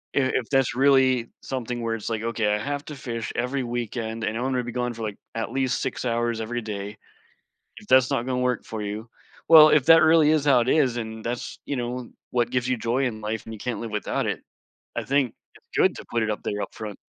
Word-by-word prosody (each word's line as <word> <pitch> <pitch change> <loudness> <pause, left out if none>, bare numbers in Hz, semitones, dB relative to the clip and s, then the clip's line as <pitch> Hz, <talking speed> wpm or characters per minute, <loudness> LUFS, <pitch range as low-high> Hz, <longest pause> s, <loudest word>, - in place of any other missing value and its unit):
i - - +4
if 120 - -1
that's 135 -2 +2
really 130 -3 +4
something 125 -2 -4
where 115 -1 -1
it's 110 - -5
like, 110 -1 -2
"Okay, 115 -2 0
I 105 - +1
have 145 +6 -3
to 150 - -7
fish 115 -5 -5
every 125 +3 -1
weekend 115 -1 -4
and 110 0 -1
I - - -3
want 130 +1 0
to 125 - 0
be 120 - -5
gone 125 0 -2
for, 115 0 -7
like, 105 -2 -4 0.2
at 115 - -3
least 130 -1 0
6 130 -1 -3
hours 120 -1 0
every 120 +2 -3
day. 105 -1 -6 0.8
If - - -12
that's 130 0 +5
not 125 -3 0
gonna 130 -1 -1
work 125 -2 0
for 110 - -6
you" 105 +3 -5 0.4
Well, 155 -2 +10
if 150 -3 +4
that 165 0 +8
really 160 -1 +5
is 155 -2 +2
how 135 -4 +5
it 120 - -1
is 130 -5 +3
and 110 -1 -5
that's, 120 +1 -4
you 140 - -2
know, 125 0 -4 0.2
what 120 -2 +1
gives 125 0 0
you 130 - +1
joy 120 +4 0
in 110 -3 -4
life 110 0 -3
and 110 - -8
you 110 - -8
can't 125 -2 -3
live 115 - -5
without 105 - -1
it, - - -2 0.5
I - - -2
think 135 -3 +1 0.2
it's - - -21
good - - +4
to - - -8
put 115 -1 0
it 110 - -1
up 105 - -3
there 105 - -3
upfront. 105 -2 -8
120 Hz, 245 wpm, -25 LUFS, 110-130 Hz, 0.8 s, Well